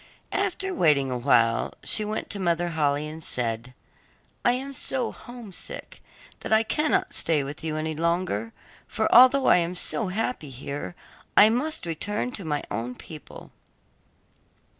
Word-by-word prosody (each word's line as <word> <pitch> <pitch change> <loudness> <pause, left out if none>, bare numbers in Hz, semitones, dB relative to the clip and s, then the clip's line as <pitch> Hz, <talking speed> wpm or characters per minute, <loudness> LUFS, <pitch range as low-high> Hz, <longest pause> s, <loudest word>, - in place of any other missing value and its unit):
After 385 -1 -1
waiting 145 - +3
awhile, 120 -2 +2
she 215 - +2
went 215 +1 -3
to 205 - -3
Mother 175 -1 +1
Holle 150 -4 +1
and 155 +2 -5
said, 120 0 -2 0.7
'I 240 - +5
am 270 +2 -4
so 260 -1 -2
homesick, 235 -6 -8 0.4
that - - -7
I 220 0 +5
cannot 315 - 0
stay 155 -3 +2
with 145 +3 -7
you 155 -1 -2
any 155 0 -2
longer, 165 - -1 0.4
for 220 - 0
although 255 +3 +7
I - - +6
am 175 +1 -1
so 205 +4 +1
happy 200 - -2
here, 140 +6 -6 0.4
I 215 +1 +9
must 305 - -2
return 205 +8 -2
to 200 - -5
my 150 -3 -2
own 120 +4 -3
people. 155 +1 -11
170 Hz, 145 wpm, -26 LUFS, 145-230 Hz, 0.7 s, I